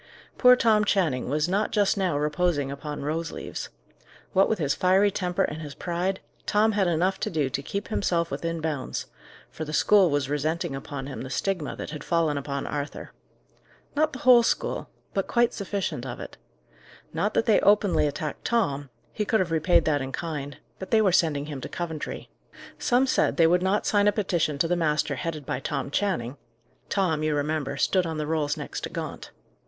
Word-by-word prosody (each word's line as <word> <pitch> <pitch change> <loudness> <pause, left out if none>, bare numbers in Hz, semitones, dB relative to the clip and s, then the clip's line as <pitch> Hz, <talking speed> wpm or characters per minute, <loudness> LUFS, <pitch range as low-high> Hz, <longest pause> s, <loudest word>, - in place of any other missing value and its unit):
Poor 250 -1 +8
Tom 220 -3 +3
Channing 160 -13 +1
was 150 +3 +1
not 200 +4 +1
just 205 -2 +2
now 185 -7 0
reposing 150 -1 0
upon 145 +1 -6
rose 165 +3 -2
leaves. - - -6 0.6
What 195 0 +4
with 220 - +1
his 145 -5 +1
fiery 190 +2 +3
temper 180 -2 0
and 155 +1 -3
his 145 -3 -7
pride, 180 +2 -2 0.3
Tom 215 +1 +3
had 200 -3 +1
enough 175 +3 +1
to - - -1
do 150 -5 -1
to 140 - -2
keep 200 +8 -5
himself 170 -6 0
within 165 -1 -3
bounds; 150 -4 -3 0.5
for 160 - -6
the 155 0 -6
school 190 +4 +5
was 145 -2 0
resenting 155 +2 -1
upon 135 0 -6
him 135 - -6
the 130 - -6
stigma 180 +2 -2
that - - -6
had 150 - -7
fallen 165 -3 +1
upon 140 0 -3
Arthur. 145 0 -5 0.8
Not 310 +1 +2
the 260 - -7
whole 250 -2 +8
school; 230 - -1 0.2
but 195 - -1
quite 240 0 +2
sufficient 200 -1 -3
of - - -6
it. - - -8 0.8
Not - - -1
that - - +2
they 220 - +5
openly 205 -6 +3
attacked 150 +1 -4
Tom; 145 - 0 0.2
he 210 - -1
could 220 +1 +1
have 180 -3 0
repaid 165 +1 +3
that 145 -3 +2
in 135 0 -4
kind; 145 -3 -5 0.2
but 190 - -7
they 220 -1 +4
were 195 - +4
sending 155 -5 +2
him 145 -3 -6
to - - -6
Coventry. 165 -3 -5 0.5
Some 250 +2 +3
said 260 - +1
they 165 - +6
would 175 +2 +4
not 190 +3 +1
sign 205 -1 +3
a - - +6
petition 175 -8 0
to 165 - +1
the 175 - +1
master 155 -3 +1
headed 160 -5 -4
by 125 - -2
Tom 140 - -3
Channing: 145 - -1 0.5
Tom, 175 -6 +1
you 155 -1 +1
remember, 145 -1 -1
stood 180 +5 +2
on 160 -1 -3
the 150 - -2
rolls 150 -2 0
next - - -5
to - - -6
Gaunt. - - -6
165 Hz, 195 wpm, -26 LUFS, 145-195 Hz, 0.8 s, Poor